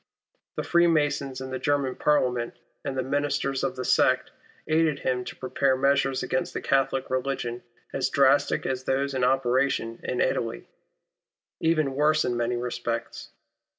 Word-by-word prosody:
Tlie - - -2
Freemasons 145 -6 +2
in 130 0 -6
the 130 - -3
German 135 0 0
Parliament, 125 -5 +1 0.3
and 135 - -4
the 130 - 0
Ministers 140 0 -1
of 130 -1 -1
the 125 - -4
sect, - - +3 0.4
aided 155 -2 +2
him 125 -2 -1
to - - -7
prepare 130 +1 +1
measures 140 0 +2
against 175 0 -2
the - - -1
Catholic 135 -1 0
religion 130 -2 -2 0.3
as 135 - 0
drastic 140 +1 +3
as 130 0 -2
those 140 +1 0
in 130 -1 -1
operation 125 -2 +1
in 125 - -3
Italy, 115 0 -1 0.9
even 155 -4 +1
worse 150 +2 +2
in 120 - 0
many 120 +1 0
respects. 120 -1 -4
135 Hz, 150 wpm, -26 LUFS, 125-140 Hz, 0.9 s, sect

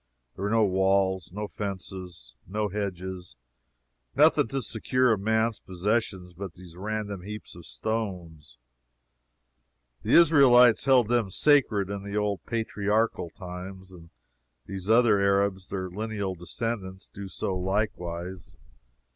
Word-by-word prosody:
There - - -9
were - - 0
no 110 0 +3
walls, 95 -1 +1
no 105 +3 -4
fences, 95 - -6
no 105 +2 -2
hedges 95 -2 -5 0.8
nothing - - +5
to 135 +2 -3
secure 125 +2 +1
a - - +2
man's 110 +2 +1
possessions 95 -1 -2
but 95 0 -7
these 90 -2 -14
random 105 0 -4
heaps 105 +3 -8
of 85 -1 -12
stones. 90 - -4 1.4
The - - -1
Israelites 130 -9 +7
held 130 -5 +5
them 120 -4 +1
sacred 105 -5 +3
in 100 -1 -4
the 100 +1 -4
old 105 -4 -1
patriarchal 110 -3 0
times, 95 +1 -9
and 85 -2 -14 0.6
these 95 +1 -6
other 115 -3 +5
Arabs, 100 -1 +1
their 95 -1 -3
lineal 105 -1 -3
descendants, 95 +1 -4
do 100 0 -8
so 95 0 -3
likewise. 90 -2 -3
100 Hz, 125 wpm, -27 LUFS, 95-110 Hz, 1.4 s, Israelites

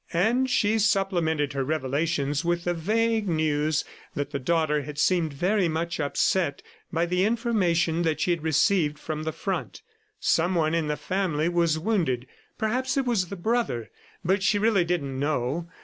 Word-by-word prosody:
And 235 +9 +2
she 220 -2 +2
supplemented 175 -8 +1
her 135 -1 -1
revelations 145 +1 -1
with 170 0 0
the 175 - 0
vague 220 +5 0
news 155 -1 +1 0.3
that 145 0 -3
the 140 - -2
daughter 155 +1 +1
had 145 +1 -8
seemed 165 0 +2
very 180 +6 +1
much 165 +1 -2
upset 145 +1 0 0.3
by 170 0 +1
the 180 +1 +1
information 190 -8 +1
that 160 -2 0
she 180 - +1
had 170 -2 0
received 160 0 +2
from 155 0 -5
the 160 0 -2
front. - - -4 0.4
Someone 165 -2 +2
in 165 -2 0
the 150 0 -1
family 170 -1 -1
was 170 -2 +2
wounded. 160 - 0 0.3
Perhaps 255 +5 -1
it 270 - +1
was 220 -7 +1
the 200 - -6
brother, 195 - -1 0.3
but 190 +3 +2
she 205 +2 +2
really 205 -3 +3
didn't 140 -7 -2
know. 145 +3 -1
170 Hz, 165 wpm, -26 LUFS, 150-195 Hz, 0.4 s, really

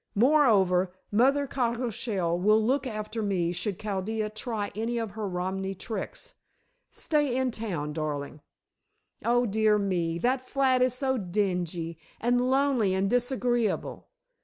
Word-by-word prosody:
"Moreover, 205 -8 +4 0.2
Mother 270 +7 +3
Cockleshell 230 -8 -1
will 215 +4 +4
look 260 +5 +1
after 215 0 -4
me 185 -5 0
should 180 +2 -3
Chaldea 210 +1 -2
try 215 -1 -3
any 230 +3 -2
of 225 -3 -2
her 215 0 -4
Romany 190 +2 -3
tricks. 220 +4 -6 0.6
Stay 295 -5 0
in 260 -1 +1
town, 175 -10 -4
darling." 150 -1 -4 0.8
"Oh, 245 +1 +3
dear 215 0 +3
me, 175 -5 0
that 255 +7 +1
flat 260 0 +1
is 255 -1 +2
so 265 -1 0
dingy, 180 -4 -2 0.2
and 245 +2 +2
lonely, 260 -8 +2
and 195 +1 0
disagreeable." 245 -2 0
215 Hz, 130 wpm, -28 LUFS, 190-245 Hz, 0.8 s, Moreover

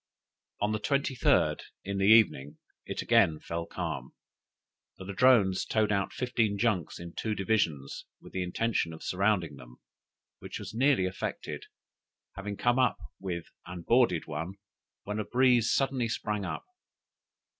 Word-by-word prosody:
"On 105 +1 +1
the 110 - -1
23d, 135 +3 +2 0.2
in 100 0 -3
the 95 - +3
evening, 80 -10 +4 0.3
it - - -3
again 80 -1 +4
fell 85 0 -5
calm; - - -5 0.8
the 95 - -9
Ladrones 100 -1 +4
towed 110 -1 +1
out 100 -1 0
fifteen 115 -5 0
junks 100 -7 0
in 85 0 -8
two 110 -1 -2
divisions, 90 -10 -1
with - - -15
the 95 - -2
intention 90 -1 -1
of 80 - -10
surrounding 90 -6 0
them, - - -14 0.6
which - - -7
was - - -8
nearly 130 -4 +3
effected, 95 0 -5 0.7
having 100 +1 -5
come 120 +1 +2
up 125 -5 +3 0.2
with 85 -3 -4 0.2
and 90 -1 -8
boarded 115 -9 +3
one, 80 +5 -5 0.5
when 105 +1 -4
a - - 0
breeze 125 -1 +3
suddenly 130 -1 +1
sprang 105 -2 -2
up. - - -5
100 Hz, 145 wpm, -29 LUFS, 90-115 Hz, 0.8 s, evening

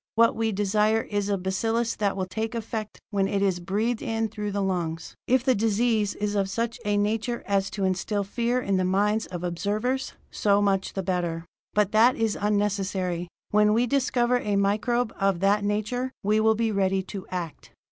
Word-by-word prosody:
"What 230 0 +4
we 225 0 0
desire 210 +2 +2
is 205 -1 -2
a 200 - +1
bacillus 225 +5 -1
that 200 -2 0
will 190 - -1
take 220 +5 -4
effect 220 -1 -5
when 195 -2 +1
it 200 0 0
is 190 -3 +1
breathed 215 +6 -1
in 225 0 -1
through 210 -1 -4
the 200 0 -1
lungs. 170 -4 -2
If 255 0 +3
the 260 -1 +4
disease 220 -1 +1
is 205 0 -2
of 195 -2 0
such 230 +3 -2
a 205 0 +1
nature 220 +3 -1
as 195 -1 +1
to 195 0 -4
instill 190 +2 0
fear 235 +5 0
in 195 -6 0
the 185 - +1
minds 205 +4 +1
of 175 -1 -6
observers, 205 +9 -1 0.2
so 200 -1 +2
much 195 -2 +1
the 195 - -3
better; 175 -3 -2 0.3
but 210 -1 +2
that 230 +4 +5
is 225 -2 0
unnecessary. 195 -4 -1 0.2
When 210 0 +4
we 235 +3 +3
discover 250 -1 +1
a 205 -4 -1
microbe 215 +4 +1
of 195 -3 +2
that 200 +1 +3
nature, 215 +5 -1
we 210 +2 +3
will 220 0 +4
be 225 0 0
ready 195 -1 +1
to 190 0 -8
act. 175 -4 -6
205 Hz, 190 wpm, -26 LUFS, 195-225 Hz, 0.3 s, that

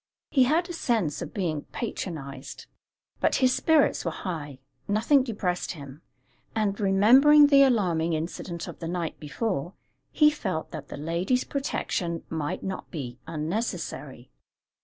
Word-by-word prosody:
He 265 -4 +5
had 325 +6 +2
a 350 - -6
sense 220 - 0
of - - -5
being 165 -7 -2
patronized; 140 - -5 0.5
but - - +2
his 255 -1 +3
spirits 320 -3 +3
were - - 0
high 150 -7 -5 0.3
nothing 220 +7 +4
depressed 205 -8 -2
him; 140 -2 -11 0.5
and, 205 -2 0
remembering 245 +10 +7
the 280 -1 +6
alarming 180 -11 +3
incident 170 +2 -4
of - - -9
the 165 - -5
night 170 -1 -3
before, 175 +2 -3 0.4
he 300 -1 +5
felt 190 - -4
that 150 -3 -7
the - - -7
lady's 170 - 0
protection 175 - -2
might 155 -2 -3
not 190 -1 -5
be 125 -7 -6
unnecessary. 155 - -4
180 Hz, 140 wpm, -27 LUFS, 155-245 Hz, 0.5 s, remembering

